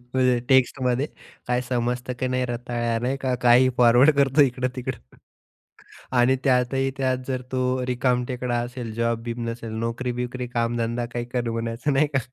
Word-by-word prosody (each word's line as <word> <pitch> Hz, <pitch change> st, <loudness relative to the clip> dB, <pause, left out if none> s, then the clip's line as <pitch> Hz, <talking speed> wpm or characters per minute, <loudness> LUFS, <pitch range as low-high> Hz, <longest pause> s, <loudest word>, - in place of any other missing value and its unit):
म्हणजे 125 Hz, -1 st, +3 dB
टेक्स्टमध्ये 130 Hz, 0 st, +2 dB, 0.4 s
काय 125 Hz, 0 st, +1 dB
समजतं 125 Hz, 0 st, -1 dB
का 130 Hz, -, 0 dB
नाही 125 Hz, 0 st, 0 dB
रताळ्या, 120 Hz, -1 st, -2 dB
नाही 130 Hz, +2 st, 0 dB
का 130 Hz, -1 st, 0 dB
काही 125 Hz, +1 st, +6 dB
फॉरवर्ड 125 Hz, +4 st, +6 dB
करतो 140 Hz, +1 st, +3 dB
इकडं-तिकडं. 125 Hz, -, -3 dB, 1.0 s
आणि 130 Hz, +2 st, +4 dB
त्यातही 135 Hz, +1 st, +2 dB
त्यात 130 Hz, -1 st, +1 dB
जर 130 Hz, -1 st, -2 dB
तो 130 Hz, 0 st, 0 dB
रिकामटेकडा 125 Hz, -1 st, 0 dB
असेल, 120 Hz, -2 st, -6 dB
जॉब-बिब 115 Hz, 0 st, -2 dB
नसेल 115 Hz, -1 st, -6 dB
नोकरी-बिकरी, 125 Hz, +2 st, -3 dB
कामधंदा 120 Hz, 0 st, -1 dB
काही 120 Hz, 0 st, -2 dB
कर 120 Hz, -2 st, -1 dB
म्हणायचं 115 Hz, +4 st, -2 dB
नाही 150 Hz, +3 st, +4 dB
का. 135 Hz, -, +4 dB
125 Hz, 140 wpm, -24 LUFS, 120-130 Hz, 1.0 s, काही